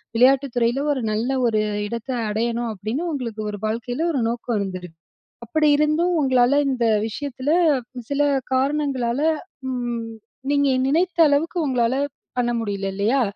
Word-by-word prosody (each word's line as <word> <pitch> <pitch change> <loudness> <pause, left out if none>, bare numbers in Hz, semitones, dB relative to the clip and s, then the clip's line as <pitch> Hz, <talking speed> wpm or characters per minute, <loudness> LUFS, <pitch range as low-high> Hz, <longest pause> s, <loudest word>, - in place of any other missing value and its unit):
விளையாட்டுத் 265 +2 +4
துறையில 240 +3 +1
ஒரு 260 - -3
நல்ல 220 +4 -1 0.2
ஒரு 215 -2 +2 0.3
இடத்தை 235 +3 -4
அடையணும், 230 +2 -1
அப்படின்னு 215 - -3
உங்களுக்கு 235 -7 -4
ஒரு 205 - -7
வாழ்க்கையில 235 +7 -2
ஒரு 270 - 0
நோக்கம் 235 -1 -2
இருந்தது, 185 -2 -4 0.6
அப்படி 305 +5 +2
இருந்தும், 310 +4 +2
உங்களால 260 +1 +4
இந்த 250 -3 0 0.2
விஷயத்தில, 270 +3 -4 0.6
சில 285 +1 +1 0.3
காரணங்களால, 270 -2 0 0.5
ம் 240 -2 -3 0.5
நீங்க 285 -1 +3 0.2
நினைத்த 340 +5 +1
அளவுக்கு 320 +5 +1
உங்களால 250 -2 +1 0.4
பண்ண 240 -1 +1
முடியல 200 -2 -3
இல்லையா? 225 +7 +2
250 Hz, 130 wpm, -22 LUFS, 230-280 Hz, 0.6 s, விளையாட்டுத்